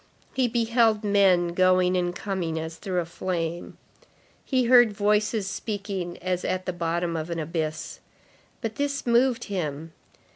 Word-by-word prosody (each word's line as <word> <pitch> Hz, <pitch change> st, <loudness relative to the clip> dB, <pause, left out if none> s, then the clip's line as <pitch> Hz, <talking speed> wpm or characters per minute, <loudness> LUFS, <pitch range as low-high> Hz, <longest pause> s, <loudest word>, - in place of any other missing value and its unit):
He 260 Hz, -2 st, +2 dB
beheld 230 Hz, -2 st, +2 dB
men 195 Hz, -4 st, +4 dB
going 185 Hz, +1 st, +3 dB
and 175 Hz, -1 st, 0 dB
coming 180 Hz, -6 st, -3 dB
as 160 Hz, 0 st, -6 dB
through 180 Hz, 0 st, -2 dB
a -, -, -5 dB
flame. 170 Hz, -1 st, -4 dB, 0.7 s
He 260 Hz, -2 st, +1 dB
heard 240 Hz, -2 st, +6 dB
voices 210 Hz, +1 st, +1 dB
speaking 195 Hz, -3 st, -4 dB
as 180 Hz, -1 st, -1 dB
at 185 Hz, 0 st, -2 dB
the 185 Hz, -, -2 dB
bottom 170 Hz, 0 st, -1 dB
of 160 Hz, +1 st, -4 dB
an 170 Hz, -, -3 dB
abyss. 155 Hz, -1 st, -3 dB, 0.6 s
But 225 Hz, -3 st, -4 dB
this 280 Hz, 0 st, -2 dB
moved 240 Hz, 0 st, +3 dB
him. 160 Hz, -5 st, -4 dB
185 Hz, 145 wpm, -26 LUFS, 170-220 Hz, 0.7 s, heard